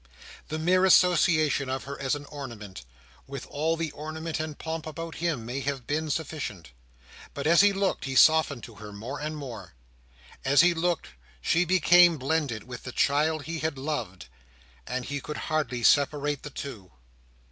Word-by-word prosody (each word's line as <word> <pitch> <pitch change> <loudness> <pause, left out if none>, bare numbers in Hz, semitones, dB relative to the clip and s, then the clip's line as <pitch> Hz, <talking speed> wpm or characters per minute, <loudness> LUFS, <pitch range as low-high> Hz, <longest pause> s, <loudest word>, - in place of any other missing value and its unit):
The 155 - -3
mere 180 +4 +3
association 160 -6 +4
of 130 0 -2
her 140 +1 -7
as 135 +1 +1
an 145 0 -8
ornament, 110 - -9 0.4
with 135 -1 -7
all 160 +3 -1
the 165 -2 -2
ornament 155 +2 -5
and 155 -1 -4
pomp 160 0 -5
about 165 +1 -6
him, 160 -10 -1
may 125 +4 -3
have 135 -2 -3
been 155 +2 -2
sufficient. 140 - -4 0.6
But 140 - -4
as 170 +3 +6
he 205 0 +5
looked, 195 -5 -1
he 135 -1 -3
softened 150 -2 +5
to 115 - -10
her, 105 0 -8
more 115 +8 -6
and 155 +1 -4
more. 115 - -8 0.7
As 140 +1 +5
he 175 +1 +5
looked, 170 0 -1 0.3
she 165 - +2
became 175 -1 +6
blended 140 -5 -1
with 125 -1 -9
the 125 - -7
child 150 +4 +1
he 165 +1 -4
had 155 -2 -2
loved, 125 -10 -4 0.6
and 125 -1 -3
he 140 0 -4
could 150 +2 -6
hardly 150 -6 -2
separate 145 0 +3
the 150 - -7
two. 110 -10 -8
145 Hz, 170 wpm, -27 LUFS, 130-160 Hz, 0.7 s, as